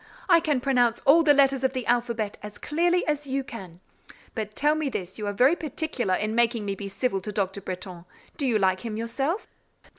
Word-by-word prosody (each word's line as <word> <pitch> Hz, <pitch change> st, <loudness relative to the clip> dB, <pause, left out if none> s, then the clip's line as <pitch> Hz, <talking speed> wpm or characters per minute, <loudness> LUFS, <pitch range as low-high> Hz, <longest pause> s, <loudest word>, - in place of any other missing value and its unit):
I 340 Hz, -3 st, +6 dB
can 305 Hz, -5 st, 0 dB
pronounce 245 Hz, -3 st, +2 dB
all 305 Hz, +5 st, +6 dB
the 310 Hz, -2 st, +5 dB
letters 275 Hz, -1 st, +3 dB
of 265 Hz, 0 st, +1 dB
the 255 Hz, -2 st, -3 dB
alphabet 235 Hz, -3 st, 0 dB
as 210 Hz, 0 st, -9 dB
clearly 345 Hz, +4 st, +1 dB
as 295 Hz, -1 st, -2 dB
you 270 Hz, +1 st, -1 dB
can. 185 Hz, -8 st, -10 dB, 0.5 s
But 215 Hz, -2 st, -5 dB
tell 295 Hz, +1 st, +3 dB
me 310 Hz, -2 st, -1 dB
this 190 Hz, -4 st, -6 dB
you 210 Hz, -, -3 dB
are -, -, 0 dB
very 255 Hz, +10 st, +4 dB
particular 290 Hz, -, -2 dB
in 215 Hz, +3 st, -2 dB
making 230 Hz, -2 st, +2 dB
me 200 Hz, -, -1 dB
be 200 Hz, 0 st, -6 dB
civil 195 Hz, -1 st, -1 dB
to 210 Hz, -, -5 dB
Dr. 200 Hz, -1 st, -2 dB
Bretton, 180 Hz, -2 st, -7 dB, 0.3 s
do 285 Hz, -4 st, -1 dB
you 230 Hz, -3 st, +3 dB
like 190 Hz, -2 st, +2 dB
him 220 Hz, -1 st, -5 dB
yourself?" 270 Hz, -, -2 dB
235 Hz, 210 wpm, -26 LUFS, 205-280 Hz, 0.5 s, I